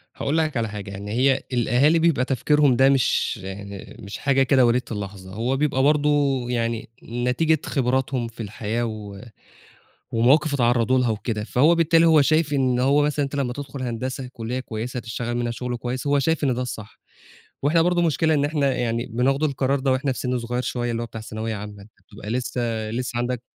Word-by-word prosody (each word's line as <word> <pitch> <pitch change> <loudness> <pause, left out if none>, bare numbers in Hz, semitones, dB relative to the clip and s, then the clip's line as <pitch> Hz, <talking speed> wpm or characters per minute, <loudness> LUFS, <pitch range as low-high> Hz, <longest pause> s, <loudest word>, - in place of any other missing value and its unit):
هاقول 150 +4 -1
لك 155 -4 0
على 115 -1 0
حاجة، 105 -1 -7
يعني 100 +1 -7
هي 130 +3 +2
الأهالي 125 +7 +3
بيبقى 160 -6 +2
تفكيرهم 140 +1 +3
ده 135 +2 +5
مش 135 -4 +1 0.6
مش 100 +1 -7
حاجة 135 -1 +2
كده 130 -1 +4
وليدة 120 +2 +2
اللحظة، 100 -3 -6
هو 120 +6 -1
بيبقى 135 -2 +1
برضه 150 +1 +3 0.4
يعني 115 -2 -2
نتيجة 125 +7 0
خِبراتهم 130 -1 0
في 115 0 -8
الحياة 110 +3 -3
و 105 -3 -7 0.9
ومواقِف 140 +6 +3
اتعرّضوا 120 0 +2
لها 125 -2 +1
وكده. 105 0 -2
فهو 145 +9 +3
بالتالي، 165 0 +4
هو 160 -2 +6
شايف 155 +1 +2
إن 130 -3 +1
هو 140 +3 +3
مثلًا 145 0 0
أنت 140 - -6
لما 135 -3 -1
تدخُل 140 0 -7
هندسة، 125 +2 -4
كُلّية 120 +2 -4
كويسة 120 +1 -5
هتشتغل 120 0 -4
منها 120 -1 -1
شُغل 125 +1 -4
كويس، 125 +3 -4
هو 145 0 +3
شايف 160 +2 0
إن 135 -3 +2
ده 125 - -3
الصح. 110 -4 -7 0.6
وإحنا 165 +4 +3
برضه 175 0 +2
مشكلة 160 -1 +2
إن 145 - +2
إحنا 145 -2 +1
يعني 120 -1 -1
بناخد 130 +4 0
القرار 140 -1 0
ده 135 0 +1
وإحنا 130 +1 0
في - - -7
سِن 125 -1 -1
صغير 120 +1 -3
شوية، 120 -1 -2
اللي 115 0 -2
هو 120 - -4
بتاع 110 -1 -8
ثانوية 110 0 -4
عامة، 105 0 -8
أنت 105 - -17 0.2
بتبقى 105 - -9
لسه 125 +1 -2 0.3
لسه 120 0 -3
عَندك 120 0 -2
125 Hz, 190 wpm, -23 LUFS, 115-140 Hz, 0.9 s, هو